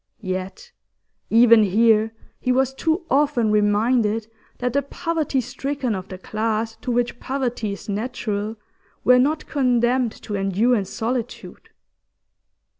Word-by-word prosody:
Yet 185 - -5 0.6
even 230 0 +7
here 220 +2 +3 0.3
he 255 - 0
was 265 +1 +2
too 320 +5 -1
often 270 -5 +2
reminded 215 +1 +2 0.3
that 250 -1 -2
the 280 - +2
poverty 300 0 -2
stricken 265 0 -3
of 190 -1 -5
the 185 - -8
class 220 +3 -2
to 250 - -4
which 240 0 -1
poverty 245 -6 -2
is 200 - -10
natural 215 -1 -3 0.5
were 250 0 +6
not 300 +4 +1
condemned 250 -3 +1
to 210 - -6
endure 200 +5 +2
in 205 -4 -1
solitude. 230 +4 -5
235 Hz, 125 wpm, -22 LUFS, 215-260 Hz, 0.6 s, even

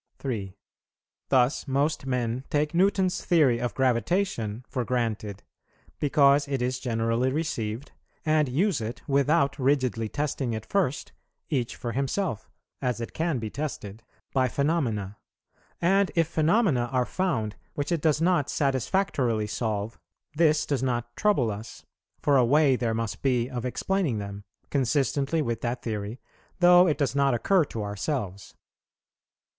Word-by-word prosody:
3. 105 -8 -4 0.7
Thus 130 +2 +2
most 140 +1 0
men 125 -1 -1
take 150 +1 0
Newton's 185 +1 +2
theory 145 -9 +3
of 120 0 -3
gravitation 125 - 0
for 125 - -2
granted, 110 -5 -2 0.6
because 140 -1 +4
it 135 -1 -1
is 125 +1 -1
generally 115 +1 0
received, 130 -5 -3 0.3
and 155 -3 +2
use 165 - +1
it 110 +1 -6
without 140 0 +2
rigidly 130 -5 +1
testing 140 -3 -2
it 110 0 -5
first, 175 -9 -1 0.4
each 125 -5 -1
for 120 - -4
himself, 140 - -2 0.3
(as 125 -2 -1
it 115 - -6
can 165 -3 0
be 110 -3 -4
tested,) 115 -8 -5 0.3
by 130 -1 +3
phenomena; 120 - -1 0.6
and 195 +3 +3
if 165 -2 +3
phenomena 155 - +2
are 125 -1 +1
found 125 - -1 0.2
which 145 +3 -2
it 170 -3 0
does 155 -2 +2
not 165 -4 +2
satisfactorily 130 - 0
solve, 105 0 -3 0.4
this 155 -1 +3
does 140 -3 -1
not 120 -2 -2
trouble 160 - +2
us, 105 +3 -9 0.4
for 145 -2 +4
a 130 - +5
way 140 +2 +4
there 115 -2 -1
must 115 -3 -3
be 125 -3 +1
of 125 -2 -5
explaining 160 - -1
them, 100 0 -6 0.3
consistently 140 +3 +1
with 115 -3 -3
that 120 +1 -3
theory, 110 +1 -4 0.4
though 180 0 +7
it 155 - +1
does 140 -4 0
not 140 -2 +3
occur 185 - +3
to 115 -7 -5
ourselves. 100 - -4
130 Hz, 140 wpm, -26 LUFS, 115-150 Hz, 0.7 s, though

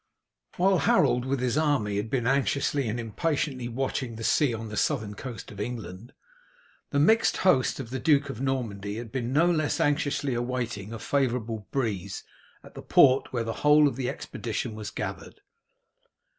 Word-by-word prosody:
While 190 0 +3
Harold 125 -3 +3
with 135 0 -1
his 125 +3 +1
army 135 -10 +1
had 105 +2 -2
been 125 -2 -1
anxiously 140 0 +1
and 115 +3 -2
impatiently 130 +2 -2
watching 130 0 -3
the 115 - -7
sea 145 +3 +3
on 110 -1 -5
the 105 - -6
southern 110 -5 0
coast 115 0 -8
of 100 - -11
England, 110 0 -6 0.8
the 140 - -1
mixed 220 +11 +4
host 140 -10 +3
of 120 -3 -6
the 130 - -3
Duke 145 0 +3
of 130 -3 -6
Normandy 110 -7 -2
had 115 -1 -7
been 125 -2 -3
no 155 +5 +4
less 155 -4 +1
anxiously 145 -2 +1
awaiting 120 -4 -3
a 115 - -5
favourable 115 -5 -1
breeze 100 -8 -3 0.4
at - - -14
the - - -8
port 135 -1 +4
where 120 -2 -1
the 115 0 -3
whole 150 0 +6
of 140 - -2
the 130 -2 -2
expedition - - -4
was 110 -1 -6
gathered. - - -6
125 Hz, 170 wpm, -27 LUFS, 115-140 Hz, 0.8 s, whole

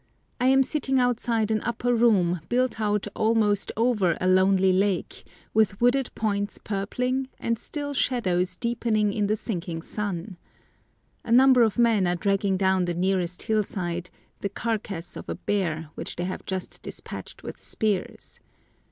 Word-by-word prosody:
I 250 - +2
am 270 +1 +5
sitting 265 -1 0
outside 235 -3 +1
an 215 -1 +1
upper 240 +1 -1
room 200 -7 +3
built 245 -2 0
out 210 -1 +1
almost 215 -2 +2
over 215 -8 +2
a - - -2
lonely 190 0 +4
lake, 190 -1 0 0.3
with 215 -2 +2
wooded 245 +2 +3
points 205 -2 -1
purpling 250 +6 -2
and 230 -1 -1
still 290 -1 -4
shadows 185 -9 0
deepening 220 -2 0
in 205 -1 0
the 215 - +2
sinking 175 -6 -4
sun. 195 -3 -4 0.9
A - - -6
number 255 +1 +7
of 220 -4 +3
men 225 -6 +3
are 175 - +1
dragging 195 +1 +1
down 190 -1 +2
the 175 -1 -2
nearest 180 0 0
hillside 180 -5 -1 0.3
the 200 - -2
carcass 205 -5 -4
of - - -8
a - - -2
bear 165 -6 -2
which - - -6
they 175 - -3
have 185 +1 -5
just 190 -1 -4
despatched - - -8
with - - -8
spears. 210 -4 -3
205 Hz, 150 wpm, -26 LUFS, 185-235 Hz, 0.9 s, number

